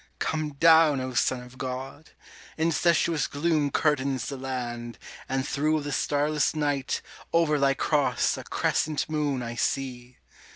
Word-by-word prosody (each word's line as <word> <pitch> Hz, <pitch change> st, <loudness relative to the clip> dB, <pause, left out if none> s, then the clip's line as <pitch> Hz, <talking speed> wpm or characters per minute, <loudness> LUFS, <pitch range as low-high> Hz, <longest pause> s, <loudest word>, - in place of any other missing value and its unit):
Come 155 Hz, -2 st, -2 dB
down, 160 Hz, -1 st, +5 dB
O 130 Hz, 0 st, -4 dB
Son 125 Hz, +1 st, +1 dB
of 125 Hz, +1 st, -15 dB
God! 130 Hz, +4 st, -6 dB, 0.5 s
incestuous 165 Hz, -1 st, +2 dB
gloom 150 Hz, 0 st, 0 dB
Curtains 140 Hz, -4 st, 0 dB
the 140 Hz, -, -4 dB
land, 120 Hz, -3 st, -5 dB, 0.3 s
and 135 Hz, +1 st, -1 dB
through 155 Hz, +2 st, +1 dB
the 145 Hz, 0 st, -5 dB
starless 150 Hz, +2 st, +1 dB
night 145 Hz, -3 st, -1 dB, 0.3 s
Over 160 Hz, -3 st, +3 dB
Thy 135 Hz, 0 st, +3 dB
Cross 135 Hz, -4 st, +1 dB
a -, -, -7 dB
Crescent 155 Hz, -1 st, 0 dB
moon 145 Hz, -4 st, -1 dB
I 115 Hz, 0 st, -5 dB
see! 125 Hz, 0 st, -3 dB
140 Hz, 135 wpm, -26 LUFS, 130-155 Hz, 0.5 s, down